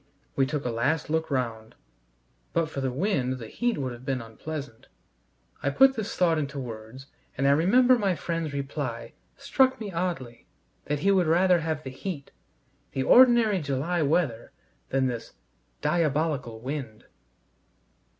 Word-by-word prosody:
We 135 -1 +2
took 145 -1 -3
a 125 - 0
last 145 +7 0
look 160 0 0
round. 115 -5 -3 0.8
But 165 -2 0
for 135 - -4
the 135 - 0
wind 135 -4 0
the 115 - -8
heat 240 - -1
would 130 -3 -2
have 120 +1 -11
been 130 -1 -1
unpleasant. 130 +3 -8 0.7
I 140 - +1
put 270 - +5
this 220 -2 -4
thought 165 -3 +3
into 140 -1 -4
words, 115 +1 -8 0.3
and 135 +1 +2
I - - +6
remember 245 - +5
my 195 -4 +1
friend's 165 -1 -3
reply 140 -3 -4 0.2
struck 265 -2 +2
me 210 -3 -5
oddly: 165 -9 -4 0.4
that 145 0 -2
he 200 - +3
would 185 -4 +3
rather 175 +2 +4
have 160 -2 -3
the 130 - -6
heat, 145 +1 -6 0.6
the 135 - 0
ordinary 235 - +6
July 145 +5 -1
weather, 145 -6 0 0.4
than 135 0 +1
this 120 -3 -4 0.5
"diabolical 150 -6 0
wind." 130 -3 -6
145 Hz, 150 wpm, -27 LUFS, 130-175 Hz, 0.8 s, I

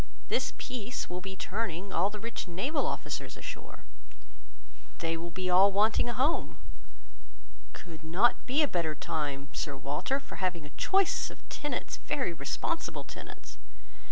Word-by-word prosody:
This - - +2
peace 245 -4 -3
will 180 +1 -2
be 190 +1 -5
turning 190 -2 -2
all 180 +4 +4
our 210 - -6
rich 230 -1 -4
naval 260 - +1
officers - - -3
ashore. - - -7 1.1
They 165 0 0
will 170 +1 -4
be 185 +2 -2
all 185 +2 +7
wanting 215 +4 +4
a - - 0
home. 275 +6 +2 1.2
Could 165 -3 -9
not 180 +9 +3
be 280 +5 +5
a - - +4
better 165 - 0
time, 145 -2 -2
Sir 140 -2 -2
Walter, 145 - 0
for - - -9
having 180 -4 0
a 145 - -10
choice 385 - +3
of - - -13
tenants, 295 - -2
very 260 -11 0
responsible 160 - -2
tenants. - - -10
190 Hz, 150 wpm, -31 LUFS, 165-240 Hz, 1.2 s, all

